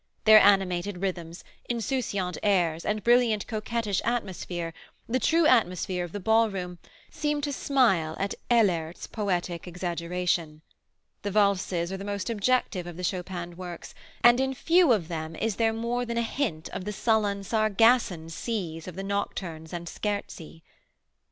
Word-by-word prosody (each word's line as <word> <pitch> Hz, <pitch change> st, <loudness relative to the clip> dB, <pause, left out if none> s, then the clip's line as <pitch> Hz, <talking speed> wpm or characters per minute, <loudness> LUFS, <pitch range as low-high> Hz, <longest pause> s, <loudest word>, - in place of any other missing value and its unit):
Their 215 Hz, 0 st, +9 dB
animated 195 Hz, -2 st, +3 dB
rhythms, 175 Hz, -3 st, -4 dB, 0.3 s
insouciant 230 Hz, -, -2 dB
airs 175 Hz, -6 st, +1 dB
and 210 Hz, -1 st, -1 dB
brilliant, 235 Hz, -3 st, +3 dB
coquettish 215 Hz, -2 st, -2 dB
atmosphere, 180 Hz, -7 st, -3 dB, 0.3 s
the 255 Hz, +3 st, 0 dB
true 330 Hz, +4 st, +3 dB
atmosphere 185 Hz, -, +2 dB
of 175 Hz, -, -7 dB
the 205 Hz, -, -5 dB
ballroom, 195 Hz, -4 st, +1 dB, 0.3 s
seem 295 Hz, -1 st, -1 dB
to 285 Hz, 0 st, -2 dB
smile 205 Hz, -, +2 dB
at 195 Hz, +1 st, -1 dB, 0.2 s
Ehlert's 180 Hz, -9 st, +2 dB
poetic 180 Hz, -5 st, -2 dB
exaggeration. 175 Hz, -2 st, -2 dB, 0.6 s
The 205 Hz, -, -3 dB
valses 195 Hz, -4 st, +1 dB
are -, -, -3 dB
the 195 Hz, -, -7 dB
most 200 Hz, +2 st, -3 dB
objective 215 Hz, -4 st, 0 dB
of 175 Hz, -1 st, -8 dB
the 180 Hz, -, -6 dB
Chopin 175 Hz, -1 st, -3 dB
works, 175 Hz, -1 st, -8 dB, 0.3 s
and 240 Hz, +1 st, +7 dB
in 265 Hz, 0 st, 0 dB
few 335 Hz, +2 st, +4 dB
of 200 Hz, -9 st, +2 dB
them 160 Hz, -1 st, -5 dB
is 220 Hz, +3 st, -2 dB
there 225 Hz, -1 st, +3 dB
more 235 Hz, +2 st, -2 dB
than 235 Hz, -1 st, -3 dB
a 235 Hz, -, +2 dB
hint 225 Hz, -, -2 dB
of 185 Hz, -, -6 dB
the 210 Hz, -, -3 dB
sullen, 205 Hz, -2 st, +1 dB
Sargasson 215 Hz, -5 st, +2 dB
seas 170 Hz, -5 st, -4 dB
of 180 Hz, -, -7 dB
the 195 Hz, -, -5 dB
nocturnes 185 Hz, -5 st, -4 dB
and 170 Hz, -1 st, -5 dB
scherzi. 185 Hz, -5 st, -5 dB
195 Hz, 150 wpm, -27 LUFS, 175-225 Hz, 0.6 s, Their